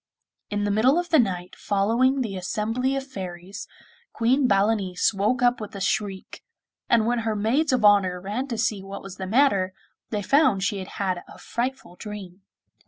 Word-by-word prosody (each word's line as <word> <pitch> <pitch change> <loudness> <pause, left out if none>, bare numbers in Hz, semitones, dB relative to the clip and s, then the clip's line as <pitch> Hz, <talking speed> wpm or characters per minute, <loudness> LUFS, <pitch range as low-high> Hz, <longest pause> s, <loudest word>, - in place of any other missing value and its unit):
In 205 0 -1
the 205 - 0
middle 245 +9 +4
of 350 0 -1
the 320 - +5
night 180 -6 -1
following 230 +7 +1
the 215 -6 -3
assembly 225 +8 -1
of 270 0 -3
fairies, 190 -5 -7 0.5
Queen 255 +4 +2
Balanice 200 -2 +2
woke 215 +6 0
up 245 -1 +3
with 210 0 -7
a - - -5
shriek, 195 0 -2 0.5
and 230 -2 +4
when 240 +1 +1
her 220 -1 -1
maids 250 +9 +1
of 250 -4 +2
honour 195 -3 +4
ran 210 +9 -3
to 235 -4 -4
see 210 -2 0
what 195 +1 -8
was 190 -1 -9
the 190 - -5
matter, 200 -5 +3 0.4
they 210 -2 -2
found 260 -5 +3
she 200 0 -1
had 185 - -6
had 185 -3 -1
a - - -13
frightful 240 -6 -4
dream. 200 -3 -8
210 Hz, 180 wpm, -25 LUFS, 195-245 Hz, 0.5 s, the